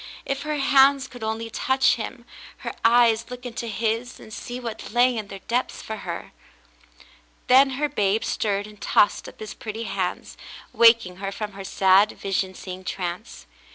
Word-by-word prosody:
If 275 0 -2
her 300 0 -2
hands 275 0 +4
could 245 -3 -11
only 225 +1 -3
touch 265 +2 +2
him, 240 +1 -6 0.4
her - - -3
eyes 230 -1 +4
look 250 0 -8
into 235 -1 -5
his 225 +3 -2
and 215 - -12
see 245 +4 -6
what 235 -3 -7
lay 245 +2 +3
in 215 -2 -4
their 195 -1 -9
depths 245 +2 -1
for 220 - -5
her! 170 -4 -6 1.1
Then 265 +2 +6
her 295 +1 +1
babe 215 -6 0
stirred 205 -1 -1
and 210 -1 -14
tossed 205 - +2
up - - -18
his 215 - -7
pretty 220 +1 -6
hands, 190 -4 -3 0.4
waking 230 -6 +5
her 195 0 -4
from 210 +1 -5
her 195 0 -9
sad, 190 +2 +4
vision 190 -1 -2
seeing 185 0 -8
trance. 175 - -5
225 Hz, 170 wpm, -24 LUFS, 200-245 Hz, 1.1 s, Then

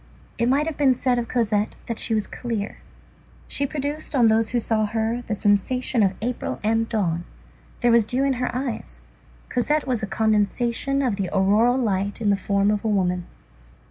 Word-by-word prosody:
It 235 +1 +2
might 280 +3 +2
have 320 -2 -4
been 270 -3 +4
said 250 0 +1
of 235 - -3
Cosette 215 -4 0
that 230 - -3
she 225 - +1
was 215 -1 0
clear. 225 -4 -4 0.7
She 280 - 0
produced 295 +1 -4
on 235 -4 +5
those 220 0 +2
who 245 - 0
saw 220 -2 +1
her 225 +2 -1
the 215 - -1
sensation 220 +5 +1
of 195 -2 +2
April 245 +1 -3
and 225 +1 +1
dawn. 175 -7 0 0.6
There 240 -1 +4
was 235 -1 +5
dew 250 +5 -1
in 275 -1 +2
her 250 - 0
eyes. 235 - -4 0.5
Cosette 295 +4 +1
was 250 -4 -1
a 215 - -2
condensation 230 +6 +1
of 235 -6 0
the 195 -3 -2
auroral 210 +6 +3
light 200 -5 -1
in 210 -3 +2
the - - +4
form 200 +1 +1
of 210 -1 -1
a - - -1
woman. 180 -4 0
225 Hz, 190 wpm, -23 LUFS, 205-250 Hz, 0.7 s, on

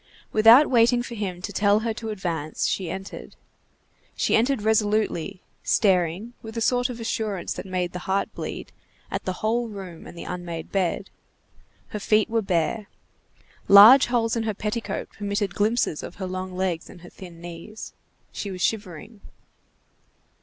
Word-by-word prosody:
Without 225 +7 +7
waiting 240 0 +4
for 240 - -7
him 190 -5 -4
to 205 - -5
tell 205 +2 +3
her 225 0 -1
to 225 0 -6
advance, 170 -7 -3
she 185 -3 -1
entered. 190 0 -7 0.8
She - - +2
entered 240 0 +2
resolutely, 210 -4 0 0.2
staring, 190 +2 +1
with 220 +1 -9
a - - +1
sort 245 +2 +1
of 240 -1 -6
assurance 215 -5 -2
that - - -7
made 180 -1 -2
the 180 - -4
heart 195 +1 0
bleed, - - -6 0.4
at - - -3
the 185 - 0
whole 235 +2 +1
room 190 -5 -9
and - - -12
the - - -6
unmade 170 -2 -6
bed. 185 -3 -1 0.8
Her 210 - -5
feet 215 +2 +2
were 230 -1 +2
bare. 195 +3 -1 0.8
Large 215 +7 +9
holes 235 -2 +1
in 230 - 0
her 220 -2 -2
petticoat 215 +3 -4
permitted 205 -1 -2
glimpses 215 -6 0
of - - -8
her 195 - -5
long 185 0 -5
legs 185 -3 -2
and 175 - -13
her 175 - -12
thin 175 -3 -12
knees. 175 +5 -9 0.4
She 205 - -5
was 185 -2 -4
shivering. 205 0 -3
205 Hz, 160 wpm, -24 LUFS, 180-225 Hz, 0.8 s, Large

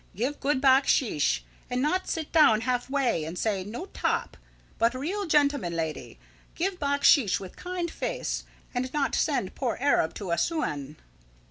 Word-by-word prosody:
Give 255 +9 -2
good 280 -1 +1
backsheesh, 260 - +3 0.3
and 250 - -1
not 360 +8 0
sit 320 -2 -3
down 260 -9 +5
halfway 250 - 0
and 165 +3 -6
say: 200 -3 0
`No 235 - -6
top'! - - -1 0.4
But 230 +2 +3
real 320 +11 -3
lady - - -12
gentleman! 180 - 0 0.4
Give 370 +2 -2
backsheesh 285 - +4
with 190 -2 -9
kind 355 -2 -4
face, - - -3 0.3
and 255 +1 -2
not 285 -2 0
send 275 -11 0
poor 250 -4 -2
Arab 270 - +2
to 195 -4 -5
Assouan." 150 - -1
260 Hz, 145 wpm, -27 LUFS, 200-295 Hz, 0.4 s, down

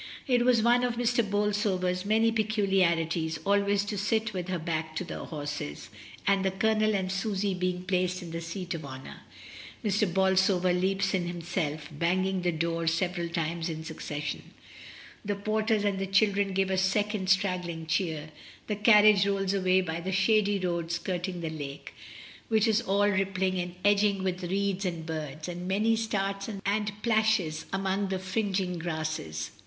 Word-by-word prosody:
It 245 -3 +3
was 245 -3 +4
one 240 +1 +4
of 245 -1 0
Mrs. 235 -2 +1
Bolsover's 200 -3 0
many 225 +2 +3
peculiarities 185 -7 +1
always 200 0 +2
to 205 -1 -3
sit 220 +2 0
with 180 -2 -4
her 185 -1 -1
back 160 -1 -3
to 170 - -2
the - - -6
horses, 145 - -5 0.4
and 195 -1 +3
the 190 - +2
Colonel 215 +2 +2
and 190 -1 -1
Susy 195 0 -1
being 180 0 -2
placed 185 -1 0
in 170 - -8
the 165 0 -4
seat 175 +2 -5
of 165 -2 -5
honour, 130 -1 -9 0.7
Mr. 205 -2 +1
Bolsover 190 -1 +3
leaps 195 +2 +1
in 180 -2 0
himself, 165 -3 -3
banging 185 +4 0
the 175 0 +1
door 165 0 -1
several 170 +1 0
times 170 0 -2
in 160 -1 -5
succession. 150 -2 -5 0.8
The 205 -1 -1
porters 215 +1 0
and 200 -1 0
the 195 - -2
children 200 0 +2
give 190 0 +1
a 190 - +2
second 200 0 0
straggling 180 -4 0
cheer, 160 -3 -1 0.3
the 210 - -2
carriage 210 -2 +6
rolls 195 -1 0
away 185 -1 +3
by 165 -2 -3
the 190 +2 -3
shady 205 +1 +3
road 170 -3 -2
skirting 180 +1 -3
the 160 -1 -3
lake, 145 -2 -7 0.5
which 220 -1 +3
is 220 0 +3
all 200 0 +2
rippling 190 -1 0
and 175 0 -4
edged 205 -1 +3
with 185 -1 -2
reeds 195 +1 -1
and 170 -4 -3
birds, 155 -1 -5
and 175 0 -5
many 215 +4 +2
starts 200 -2 -2 0.2
and 205 +1 -1
plashes 215 -8 +1
among 195 +1 0
the 190 0 -1
fring 190 +1 -1
ing 180 -2 -3
grasses. 155 - -3
190 Hz, 165 wpm, -28 LUFS, 170-205 Hz, 0.8 s, carriage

